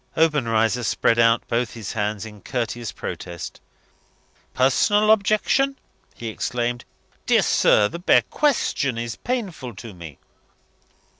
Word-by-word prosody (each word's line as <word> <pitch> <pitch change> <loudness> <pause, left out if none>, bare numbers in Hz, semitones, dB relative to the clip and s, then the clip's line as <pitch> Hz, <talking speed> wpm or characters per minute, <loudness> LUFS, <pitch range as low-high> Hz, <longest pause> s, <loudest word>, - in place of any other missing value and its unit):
Obenreizer 125 -7 +2
spread 115 0 +1
out 115 0 +3
both 120 +1 -1
his 110 -4 -6
hands 105 -1 -2
in 105 -2 -11
courteous 120 -1 -3
protest. 85 -2 -7 0.9
"Personal 205 +11 +3
objection!" 220 +6 +2 0.4
he 115 - -6
exclaimed. 120 +2 -3 0.4
"Dear - - +4
sir, 105 - +4
the 170 - -7
bare 175 - +4
question 180 - 0
is 115 -1 -4
painful 190 - -4
to 105 +2 -9
me." 85 -5 -10
120 Hz, 120 wpm, -23 LUFS, 110-165 Hz, 0.9 s, Dear